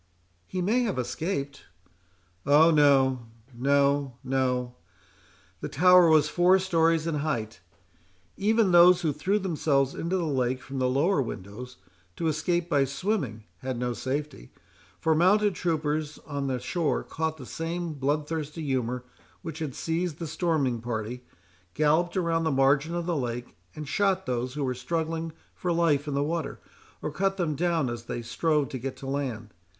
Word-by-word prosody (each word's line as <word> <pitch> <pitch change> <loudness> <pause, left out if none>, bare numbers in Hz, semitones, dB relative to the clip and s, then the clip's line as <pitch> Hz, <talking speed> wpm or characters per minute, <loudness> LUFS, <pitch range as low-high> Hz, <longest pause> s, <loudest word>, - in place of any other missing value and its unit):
"He 185 -1 -3
may 220 +7 +2
have 220 - -1
escaped." 140 +3 -3 0.8
"Oh! 155 +4 +6
no, 135 -5 +4 0.3
no, 140 +1 +2
no—the 125 -8 -5
tower 180 +2 +6
was 155 -2 +5
four 180 +4 +4
stories 165 -4 +2
in 165 -2 -1
height. 115 -9 -3 0.8
Even 215 0 +2
those 175 +1 +7
who 155 -4 0
threw 185 +8 0
themselves 150 -8 +1
into 175 +3 -2
the 180 - -1
lake 130 -4 0
from 135 +1 -6
the 130 0 +2
lower 145 +6 +2
windows, 120 +2 -7 0.4
to - - -4
escape 165 +2 0
by 145 -5 +3
swimming, 140 - -2 0.2
had 130 +2 -4
no 125 0 -1
safety; 135 - -4 0.5
for 160 -1 +2
mounted 200 +5 +4
troopers 155 -3 -1
on 140 -2 -3
the 130 -1 -1
shore 150 +5 -1
caught 160 0 -3
the 130 - -9
same 165 +3 -4
bloodthirsty 150 +2 -2
humour 125 -3 -1 0.4
which 165 -2 -6
had 150 -5 -4
seized 165 -1 -2
the 170 - -5
storming 155 -7 0
party, 120 +1 -4 0.5
galloped 160 +5 +2
around 165 -2 +1
the 160 - +1
margin 140 +4 +2
of 175 -1 -2
the 175 -1 -1
lake, 120 -3 -4 0.2
and 150 -1 -6
shot 190 +3 +1
those 125 +1 -2
who 150 - -2
were 130 -1 0
struggling 160 +5 -3 0.2
for 180 - -2
life 160 -4 +2
in 145 - -2
the 140 - +1
water, 160 +1 -3 0.4
or 150 - -2
cut 195 +5 0
them 170 -5 0
down 165 -2 0
as 120 -1 -5
they 120 - -4
strove 150 +4 0
to 130 - -5
get 135 +2 -5
to - - -10
land. 130 -6 -4
150 Hz, 160 wpm, -27 LUFS, 130-170 Hz, 0.8 s, those